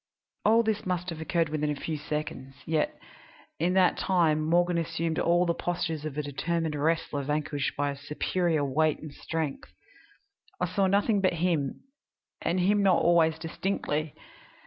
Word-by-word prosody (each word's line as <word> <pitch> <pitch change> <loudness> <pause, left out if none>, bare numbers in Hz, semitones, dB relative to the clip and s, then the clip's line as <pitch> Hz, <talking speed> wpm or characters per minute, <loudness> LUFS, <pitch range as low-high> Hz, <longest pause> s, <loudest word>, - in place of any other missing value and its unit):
"All 225 +2 +5
this 220 -2 -1
must 180 0 -2
have 160 -1 -6
occurred 165 -1 0
within 150 -1 -1
a 150 - 0
few 155 +2 -4
seconds, 145 -3 -5
yet 155 -1 0 0.6
in 175 +3 +2
that 185 -2 +4
time 165 -5 +2
Morgan 175 +2 +2
assumed 165 0 -2
all 175 +1 +3
the 170 - +1
postures 165 -3 -2
of 150 -2 -5
a 150 - -1
determined 160 +3 -2
wrestler 150 -1 0
vanquished 145 0 -2
by 145 0 0
superior 150 +2 -1
weight 155 +3 +2
and 155 -2 -9
strength. 160 -3 -4 0.9
I - - +1
saw 190 +2 +1
nothing 200 +1 +2
but 185 - +2
him, 165 -5 0 0.6
and 180 - 0
him 205 +3 +3
not 190 -3 +4
always 165 -2 +4
distinctly. 160 -2 -2
165 Hz, 155 wpm, -28 LUFS, 150-180 Hz, 0.9 s, All